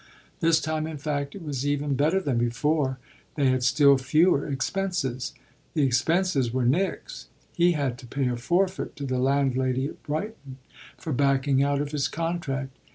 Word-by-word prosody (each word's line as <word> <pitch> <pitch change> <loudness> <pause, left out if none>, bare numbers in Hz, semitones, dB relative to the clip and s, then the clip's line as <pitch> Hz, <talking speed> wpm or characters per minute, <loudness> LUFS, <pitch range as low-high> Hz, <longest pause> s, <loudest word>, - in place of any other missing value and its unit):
This 165 -2 +4
time 155 0 -2
in 160 -1 -6
fact 145 -1 -3
it 195 - -8
was 140 -4 -3
even 145 0 0
better 155 +7 +2
than 140 -10 -1
before 130 +3 0 0.4
they 140 -3 +3
had 130 0 0
still 140 +1 +5
fewer 150 +3 +3
expenses. 140 -3 -2 0.4
The 150 - +3
expenses 140 +1 +1
were 130 0 0
Nick's: 190 - -1 0.3
he 175 0 +3
had 135 -5 -2
to 125 - -11
pay 135 +2 -1
a 125 - 0
forfeit 180 +10 0
to 140 - -5
the 130 -1 -1
landlady 130 -1 +1
at - - -13
Brighton 150 -4 -5 0.4
for 160 - -4
backing 135 0 +2
out 140 0 +1
of 145 0 -4
his 145 -2 0
contract. 150 -5 -3
140 Hz, 165 wpm, -26 LUFS, 130-160 Hz, 0.4 s, still